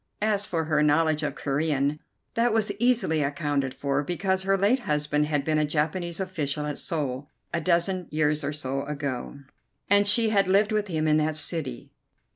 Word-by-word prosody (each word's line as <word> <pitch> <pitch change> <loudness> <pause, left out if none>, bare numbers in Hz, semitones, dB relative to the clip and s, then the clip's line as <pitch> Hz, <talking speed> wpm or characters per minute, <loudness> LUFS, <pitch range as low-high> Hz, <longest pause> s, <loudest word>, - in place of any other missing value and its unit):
As 205 -1 +1
for 165 -2 -1
her 155 -1 +1
knowledge 155 +1 +3
of 150 - -2
Corean, 145 0 0 0.3
that 230 0 +2
was 215 -2 +1
easily 225 -10 +2
accounted 145 -2 -1
for, 140 +1 -1
because 185 +4 -1
her 195 +1 +1
late 205 +7 +3
husband 150 - 0
had 145 -2 -1
been 155 -1 +1
a - - +2
Japanese 160 +4 -1
official 150 -6 -3
at 150 -1 -4
Seoul 145 -3 -3 0.2
a 170 - 0
dozen 180 +1 +1
years 150 0 0
or 140 - -1
so 135 -2 -3
ago, 140 -2 -4 0.5
and 205 0 +5
she 225 +1 +3
had 200 -3 +3
lived 200 +3 +3
with 210 -1 0
him 155 -4 -1
in 155 0 +4
that 155 0 0
city. 150 -5 -1
155 Hz, 180 wpm, -26 LUFS, 145-190 Hz, 0.5 s, and